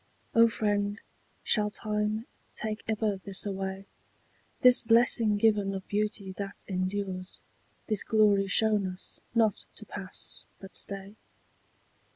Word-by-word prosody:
O 230 0 +7
friend, 205 -2 0 0.4
shall 210 -2 +2
time 210 +1 -1 0.3
take 215 0 -4
ever 215 -2 0
this 195 +1 -1
away, 195 -1 -4 0.8
This 250 -2 +7
blessing 230 -2 +4
given 205 -2 +2
of 190 - -6
beauty 205 -1 -1
that 200 0 -6
endures, 185 0 -3 0.5
This 215 -3 0
glory 205 -3 +4
shown 210 -1 +3
us, 185 0 -7 0.2
not 220 -3 +2
to 215 - -8
pass 195 -2 -7 0.2
but 195 0 -11
stay? 200 +1 -3
205 Hz, 120 wpm, -29 LUFS, 195-215 Hz, 0.8 s, O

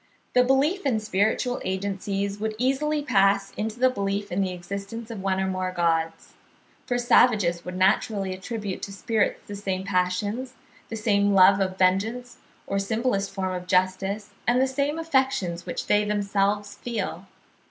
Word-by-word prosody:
The 250 - +5
belief 280 +9 +2
in 250 -6 +1
spiritual 215 +4 0
agencies 195 +1 -2
would 215 0 -2
easily 290 +5 0
pass 195 -5 +3
into 220 +2 -4
the 255 0 +4
belief 200 -3 -2
in 185 +3 0
the 190 - 0
existence 200 +6 -6
of 215 -4 -6
one 190 -1 0
or 190 - +1
more 185 -1 -2
gods. 165 -2 -1 0.5
For 245 - 0
savages 215 -8 +3
would 180 0 -6
naturally 195 0 +1
attribute 200 0 -5
to 200 - -5
spirits 215 +1 0
the 205 - -8
same 190 -2 -3
passions, 200 +7 -1 0.3
the 225 - -4
same 205 -2 +2
love 195 +1 +7
of 185 -1 -1
vengeance 220 +7 +1 0.3
or 195 - -1
simplest 200 0 0
form 190 -1 -3
of 180 0 -5
justice, 190 +3 0 0.2
and 240 +1 +4
the 260 - +4
same 280 +3 -1
affections 265 - 0
which - - -3
they 210 0 +3
themselves 205 0 0
feel. 200 -6 -4
200 Hz, 160 wpm, -25 LUFS, 190-235 Hz, 0.5 s, love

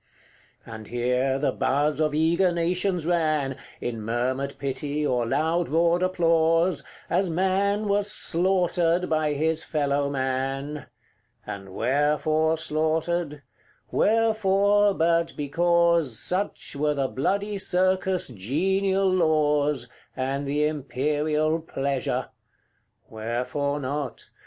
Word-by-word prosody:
CXXXIX. - - -10
And 110 -1 -9
here 125 +2 0
the 140 - 0
buzz 145 +2 0
of 155 -1 +1
eager 170 +4 +3
nations 175 0 0
ran, 155 -6 +1 0.2
In 115 -2 -4
murmured 130 +5 -2
pity, 145 +2 -3
or 125 -4 0
loud 160 +7 0
roared 170 +3 +2
applause, 165 -1 +2 0.2
As 190 -1 +1
man 195 +4 +1
was 205 0 0
slaughtered 175 -2 +1
by 155 -1 +1
his 160 +2 0
fellow 145 -2 0
man. 135 +2 -3 0.6
And 95 -1 -7
wherefore 150 +5 +1
slaughtered? 155 -1 -1 0.5
wherefore, 205 -2 +3
but 165 0 +1
because 170 -2 +2
Such 185 - -2
were 150 +1 0
the 135 -1 0
bloody 200 +10 -1
circus' 185 -1 +1
genial 190 - 0
laws, 150 -6 +2 0.3
And 135 +2 -2
the 145 +2 +1
imperial 150 +2 0
pleasure. 140 -4 -2 0.8
Wherefore 125 +6 -2
not? 140 -1 -5
155 Hz, 105 wpm, -25 LUFS, 140-175 Hz, 0.8 s, eager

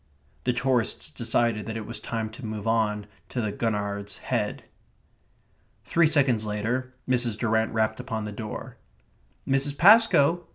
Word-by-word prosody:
The 125 - +2
tourists 125 -2 0
decided 115 -2 0
that 110 0 -4
it 110 - -5
was 115 - -5
time 110 -2 -4
to 120 +4 -11
move 110 -2 -5
on 110 -2 +1 0.2
to 125 - -3
the 110 -3 -1
Gurnard's 100 -2 -3
Head. 110 -5 -2 1.2
Three 165 -1 +3
seconds 135 -7 +2
later 115 +5 -2
Mrs. 120 -4 +1
Durrant 110 -1 +1
rapped 110 -1 0
upon 110 -1 -4
the 105 - -5
door. 105 +1 -7 0.7
"Mrs. 140 +1 +2
Pascoe?" 175 -5 +5
115 Hz, 140 wpm, -26 LUFS, 105-130 Hz, 1.2 s, Pascoe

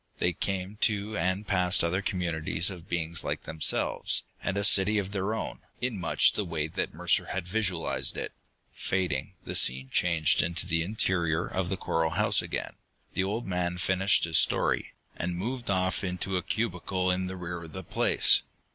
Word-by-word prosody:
They 90 - +1
came 95 +2 -3
to 105 0 +1
and 95 +4 0
passed 90 -4 +3
other 90 +3 0
communities 90 -1 +1
of 90 -3 -11
beings 85 -1 -2
like - - -3
themselves, 80 -1 +1 0.2
and 100 0 -2
a 100 - 0
city 100 +1 +5
of 100 -1 -2
their 100 +2 -1
own, - - -5 0.2
in 125 -5 -2
much 90 - +3
the 105 - -1
way 80 -4 -2
that - - -2
Mercer - - +2
had 95 -2 -4
visualized 95 -4 -1
it. - - -4 0.4
Fading, 90 -8 -2
the - - -4
scene 65 +1 +3
changed 85 -4 +3
to 85 +1 0
the 80 -2 +1
interior 85 -3 0
of 90 -2 -2
the 95 - -1
coral 80 -2 0
house 95 +6 +3
again. - - -5 0.4
The - - +1
old 110 +5 -3
man 90 -1 -2
finished 95 +3 +3
his 80 -2 +4
story, - - +1 0.2
and 90 +1 -2
moved 120 +5 -4
off 95 -1 0
into 90 +1 -2
a 90 - +1
cubicle 95 -3 -1
in 90 0 -1
the 95 0 -6
rear 85 -1 -5
of 80 - -13
the 95 - -6
place. - - +3
90 Hz, 180 wpm, -28 LUFS, 85-100 Hz, 0.4 s, city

